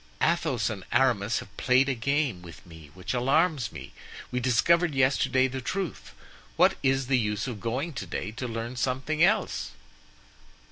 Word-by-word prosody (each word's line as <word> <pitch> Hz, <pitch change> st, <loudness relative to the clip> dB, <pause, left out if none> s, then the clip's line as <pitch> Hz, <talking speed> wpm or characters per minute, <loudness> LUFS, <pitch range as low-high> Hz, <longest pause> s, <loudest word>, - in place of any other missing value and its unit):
Athos -, -, +1 dB
and -, -, -6 dB
Aramis 120 Hz, -4 st, +2 dB
have 100 Hz, -, -15 dB
played 130 Hz, +2 st, +3 dB
a 135 Hz, -, +1 dB
game 135 Hz, -4 st, -1 dB
with 85 Hz, -2 st, -13 dB
me 80 Hz, -3 st, -13 dB
which 90 Hz, +5 st, -4 dB
alarms 135 Hz, +3 st, +1 dB
me. -, -, -10 dB, 0.4 s
We 125 Hz, -, -1 dB
discovered 150 Hz, +7 st, +2 dB
yesterday 130 Hz, 0 st, +3 dB
the 130 Hz, 0 st, -5 dB
truth; 190 Hz, +6 st, -4 dB, 0.4 s
what -, -, +4 dB
is 135 Hz, 0 st, +1 dB
the 130 Hz, 0 st, +2 dB
use 105 Hz, -2 st, -1 dB
of 120 Hz, -5 st, -5 dB
going 130 Hz, -, -3 dB
to 95 Hz, -, -6 dB
day 95 Hz, +4 st, -4 dB
to 125 Hz, +3 st, -5 dB
learn 115 Hz, +2 st, -5 dB
something 135 Hz, +6 st, 0 dB
else?" 210 Hz, +5 st, +1 dB
130 Hz, 160 wpm, -27 LUFS, 115-140 Hz, 0.4 s, what